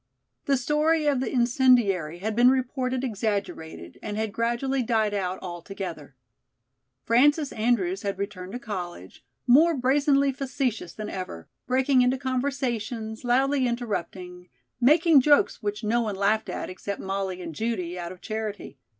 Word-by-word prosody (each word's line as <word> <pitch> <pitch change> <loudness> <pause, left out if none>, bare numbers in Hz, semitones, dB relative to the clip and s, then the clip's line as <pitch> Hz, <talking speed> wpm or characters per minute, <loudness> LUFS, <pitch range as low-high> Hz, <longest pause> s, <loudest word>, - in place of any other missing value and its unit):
The 275 -1 +2
story 300 +4 +1
of 285 -3 +2
the 260 - -2
incendiary 235 - +3
had 215 +1 -2
been 245 +2 +6
reported 260 0 -1
exaggerated 200 - -4
and 210 -1 -5
had 220 -2 -2
gradually 240 +4 0
died 220 -3 +1
out 190 -2 -2
altogether. 175 -5 -7 0.9
Frances 290 +5 +3
Andrews 205 -5 0
had 200 -1 -3
returned 195 -1 -5
to - - -3
college, 175 - -7 0.2
more 315 +7 +5
brazenly 275 +1 +3
facetious 260 - -3
than 215 -1 -6
ever, 135 - -6 0.2
breaking 260 +1 +3
into 250 +1 +2
conversations, 250 -4 -3
loudly 265 +2 +2
interrupting, 185 -6 -4 0.3
making 305 +3 +5
jokes 290 -2 +3
which 210 0 -3
no 230 +3 +1
one 215 -3 -2
laughed 210 +3 +1
at - - -4
except 195 +2 -6
Molly 190 -1 -3
and 170 -3 -6
Judy 185 -3 -3
out 170 0 -5
of 185 - -12
charity. 215 - -5
225 Hz, 140 wpm, -26 LUFS, 195-260 Hz, 0.9 s, been